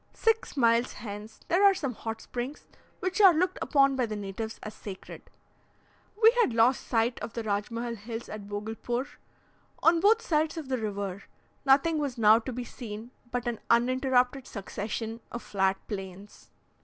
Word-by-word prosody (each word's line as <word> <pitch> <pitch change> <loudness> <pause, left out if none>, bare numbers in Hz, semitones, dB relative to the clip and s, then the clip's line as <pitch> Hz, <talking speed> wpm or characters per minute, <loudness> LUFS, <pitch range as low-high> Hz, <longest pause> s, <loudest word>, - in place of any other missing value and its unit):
Six 450 -8 +1
miles 235 -1 +3
hence, 210 0 -8
there 360 +4 +3
are 395 -1 +7
some 275 -8 -2
hot 225 0 -5
springs, 250 +4 -5 0.4
which 370 +3 0
are 380 -4 +8
looked 365 +3 +1
upon 275 -2 +4
by 250 -3 0
the 215 - -4
natives 205 +2 -5
as 210 - -6
sacred. 195 -3 -10 0.9
We 455 +1 +7
had 260 - +2
lost 235 +3 +3
sight 235 0 +1
of 230 - -6
the 230 - -3
Rajmahal 230 +3 -2
Hills 225 +2 -6
at 210 -2 -8
Bogulpore; 225 +4 -3 0.8
on 330 0 +5
both 440 +5 +4
sides 315 0 +1
of 300 -5 -6
the 260 -2 0
river, 200 -3 -4 0.4
nothing 285 +4 +4
was 280 -4 -2
now 220 0 +6
to 245 +3 -6
be 245 0 -4
seen 225 -1 -8 0.2
but 245 0 -3
an 235 -2 -2
uninterrupted 255 +2 +2
succession 220 +2 -5
of 240 - -6
flat 195 -1 +1
plains. 195 -1 -8
235 Hz, 165 wpm, -28 LUFS, 215-275 Hz, 0.9 s, are